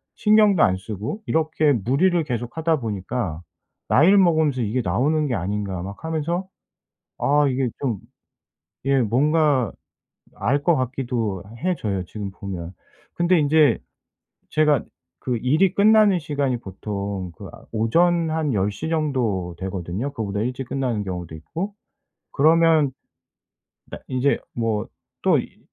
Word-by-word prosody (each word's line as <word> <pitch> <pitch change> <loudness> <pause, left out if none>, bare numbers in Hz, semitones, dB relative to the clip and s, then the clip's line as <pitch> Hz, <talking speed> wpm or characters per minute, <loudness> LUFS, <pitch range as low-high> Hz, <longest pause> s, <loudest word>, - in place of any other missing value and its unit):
신경도 210 -4 +4
안 95 - +3
쓰고 105 - -5
이렇게 155 -2 +2
무리를 140 - +2
계속 120 -4 -4
하다 160 -1 +1
보니까 105 -5 -3 0.5
나이를 185 +8 +6
먹으면서 160 -8 +3
이게 115 +3 0
나오는 145 - +1
게 125 - -1
아닌가 95 0 -3
막 100 - -8
하면서 165 +3 -2 0.7
아 145 +1 +3
이게 130 -1 0
좀 120 -7 -1 0.9
예 135 -1 +3
뭔가 135 - +2 0.6
알 135 +8 0
것 170 - +4
같기도 120 - -2 0.2
해져요 110 - -1
지금 100 +1 -6
보면. 90 -3 -6 0.4
근데 175 +1 +3
인제 150 -4 +4 0.7
제가 150 -5 +3 0.3
그 125 -2 -2
일이 155 - +2
끝나는 210 -2 +5
시간이 140 -4 -1
보통 100 -2 -5
그 - - -9
아 - - -14
오전 165 +9 +2
한 155 -3 0
10:00 100 +9 -1
정도 120 - -1
되거든요 95 +6 -4
그거보다 105 -6 -3
일찍 125 +2 -3
끝나는 125 -6 -1
경우도 90 -4 -5
있고. 170 - -5 0.6
그러면 160 -1 +4 1.0
나 - - -6
인제 130 +2 +1 0.2
뭐 115 -3 -1 0.4
또 - - +4
이 - - -12
130 Hz, 255 characters per minute, -23 LUFS, 105-160 Hz, 1.0 s, 나이를